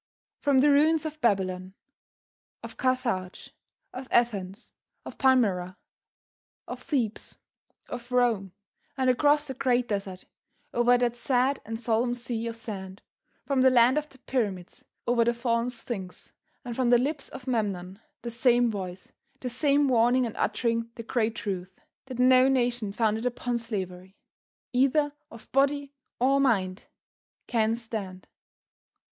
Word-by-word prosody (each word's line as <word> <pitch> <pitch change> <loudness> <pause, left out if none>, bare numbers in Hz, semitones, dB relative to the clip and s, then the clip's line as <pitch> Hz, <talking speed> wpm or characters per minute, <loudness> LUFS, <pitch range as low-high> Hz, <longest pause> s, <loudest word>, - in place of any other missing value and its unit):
From 275 -2 +3
the 290 +1 +5
ruins 310 +2 +4
of 310 0 -6
Babylon, 190 -3 0 0.9
of - - -8
Carthage, 245 -8 -2 0.4
of 260 +1 -7
Athens, 205 -3 0 0.3
of - - -9
Palmyra, 200 -9 +2 0.9
of - - -7
Thebes, 240 -8 -2 0.5
of 245 +1 -8
Rome, 235 -6 +2 0.5
and 260 -1 +3
across 295 +3 +3
the 265 - -5
great 250 -2 +1
desert, 195 -3 -4 0.5
over 245 +1 +4
that 240 -1 0
sad 255 +2 +1
and 225 0 -4
solemn 240 +1 0
sea 235 -1 -4
of 230 - -4
sand, 195 -4 -7 0.4
from 275 -2 +1
the 260 - +7
land 245 +1 +5
of 300 0 -9
the 265 - -18
pyramids, 205 -9 -3 0.2
over 235 -1 +3
the 235 +1 +1
fallen 235 0 0
Sphinx 225 -6 -7 0.3
and 240 -1 -5
from 255 -1 +1
the 245 - +7
lips 275 +3 -2
of 250 - -10
Memnon 200 -6 -2 0.2
the 235 - -4
same 240 0 +3
voice, 185 -3 -7 0.3
the 250 - -3
same 285 +2 +2
warning 245 0 +3
and 225 - -5
uttering 230 -1 -1
the 230 - -7
great 225 -1 0
truth, 185 -2 -5 0.3
that 260 -2 -7
no 255 +1 +6
nation 245 -5 +1
founded 220 +2 0
upon 245 0 -2
slavery, 190 -4 -6 0.6
either 280 +3 +2 0.2
of 230 -1 -14
body 280 +1 +1 0.3
or 270 +3 +3
mind, 200 -8 +1 0.6
can 225 -1 +1
stand. 215 -5 -6
240 Hz, 140 wpm, -27 LUFS, 210-255 Hz, 0.9 s, the